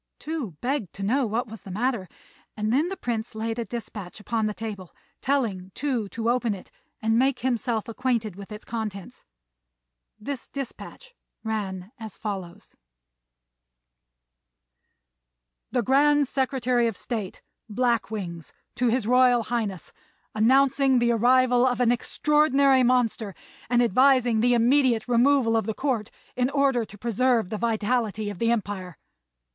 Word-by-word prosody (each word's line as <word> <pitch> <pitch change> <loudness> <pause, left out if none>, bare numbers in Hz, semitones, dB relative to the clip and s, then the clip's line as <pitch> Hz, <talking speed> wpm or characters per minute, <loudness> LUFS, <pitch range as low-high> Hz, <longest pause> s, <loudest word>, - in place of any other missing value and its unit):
Tou 300 - -5
begged 250 - -2
to 195 - -7
know 250 +5 +1
what 230 +4 -1
was 220 -3 -9
the - - -11
matter; 215 -1 -1 0.5
and 215 +1 0
then 300 +7 +2
the 385 - -5
Prince 230 -1 -4
laid 225 +1 -3
a 235 - -2
despatch 210 -3 -7
upon 220 0 -1
the 210 - -2
table, 205 -6 -7 0.3
telling 220 -10 -1
Tou 250 -8 -2
to 230 +2 -4
open 240 -4 0
it 185 - -13 0.3
and 225 +1 +3
make 265 0 +1
himself 235 -3 -1
acquainted 230 -4 -1
with 200 +2 -10
its 210 0 -8
contents. 215 -4 -6 0.9
This 265 +3 -5
despatch 280 - -8 0.3
ran 200 -3 -4
as 220 -3 -8
follows: 195 -5 -6 2.9
"The 245 0 0
Grand 290 +3 +4
Secretary 255 -3 +1
of 225 -5 -3
State, 215 -6 -5 0.3
Black 235 +1 +1
Wings, 170 -8 -6 0.2
to 250 - +2
His 235 -1 +1
Royal 250 0 +4
Highness, 215 -6 -3 0.4
announcing 265 +4 +4
the 240 0 +3
arrival 245 +1 +4
of 250 -1 +1
an 240 -1 +4
extraordinary 280 +1 +3
monster, 240 -5 +1 0.3
and 245 0 +4
advising 250 0 +4
the 245 +2 +3
immediate 245 -1 +3
removal 245 -1 +3
of 225 - 0
the 220 - -2
Court 250 -7 -1 0.3
in 250 0 +1
order 275 -4 +2
to 210 0 -14
preserve 235 -1 +1
the 215 - -3
vitality 220 -2 0
of 200 - -10
the 230 - +1
empire. 200 -6 -2
235 Hz, 140 wpm, -25 LUFS, 215-255 Hz, 2.9 s, Grand